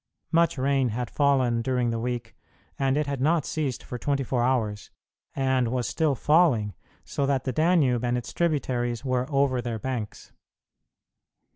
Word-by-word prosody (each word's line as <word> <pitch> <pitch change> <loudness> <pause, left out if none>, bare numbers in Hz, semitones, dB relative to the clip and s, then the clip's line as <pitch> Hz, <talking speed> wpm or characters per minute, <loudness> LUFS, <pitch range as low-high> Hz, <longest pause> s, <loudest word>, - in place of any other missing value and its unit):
Much 165 -2 +3
rain 135 -1 +1
had 120 +2 -4
fallen 130 -5 +2
during 125 -1 0
the 115 - -2
week, 120 -1 -4 0.4
and 135 0 +2
it 150 - +1
had 140 -2 -3
not 155 +1 +2
ceased 145 -6 -3
for 125 - -7
twenty 140 +2 0
four 125 -1 -1
hours 115 -5 0 0.5
and 130 -2 +1 0.2
still 155 +2 +1
was 130 - -8
falling, 145 - +3 0.3
so 140 - -1
that 135 -2 +1
the 130 - -2
Danube 155 -7 +2
and 120 0 +1
its 120 - -6
tributaries 130 -7 -1
were 130 -1 0
over 135 -3 +2
their 120 -1 -3
banks. 120 -3 -5
130 Hz, 160 wpm, -26 LUFS, 120-140 Hz, 0.5 s, Much